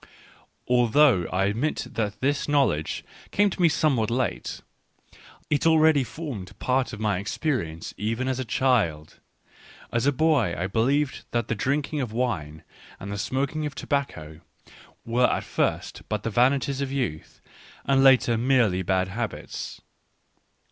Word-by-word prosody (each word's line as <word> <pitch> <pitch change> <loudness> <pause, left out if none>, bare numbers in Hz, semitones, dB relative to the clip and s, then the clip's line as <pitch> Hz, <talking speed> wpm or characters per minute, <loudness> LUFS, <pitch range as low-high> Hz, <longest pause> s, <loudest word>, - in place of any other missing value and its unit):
Although 125 - +4
I 95 +1 +1
admit 115 +10 -1
that 105 -2 -3
this 140 +2 0
knowledge 130 - +1 0.2
came 205 0 +2
to 180 - -4
me 170 - +6
somewhat 140 -8 +1
late, 115 - -2 0.9
it 150 +2 +1
already 160 -3 +5
formed 125 - -7
part 130 0 0
of 110 - -8
my 105 -4 0
experience 100 - -3
even 115 +5 -2
as 130 -1 -1
a - - -1
child. 105 - 0 0.7
As 120 +3 +1
a - - +5
boy 140 - +2
I 85 - -1
believed 130 +8 0
that 120 -1 -2
the - - +1
drinking 145 +6 -1
of 120 -4 -3
wine 85 -11 -2 0.4
and 100 - -7
the 100 - -3
smoking 140 +6 -1
of 150 - -9
tobacco 80 - -3 0.7
were 120 +2 +3
at - - -1
first - - -2
but 105 -2 -2
the 115 - -2
vanities 135 +4 +2
of 135 -1 -2
youths, 125 - -4 0.5
and 135 -1 +3
later 125 -4 +5
merely 120 -7 +2
bad 95 0 0
habits. 115 +3 -5
125 Hz, 145 wpm, -25 LUFS, 100-140 Hz, 0.9 s, me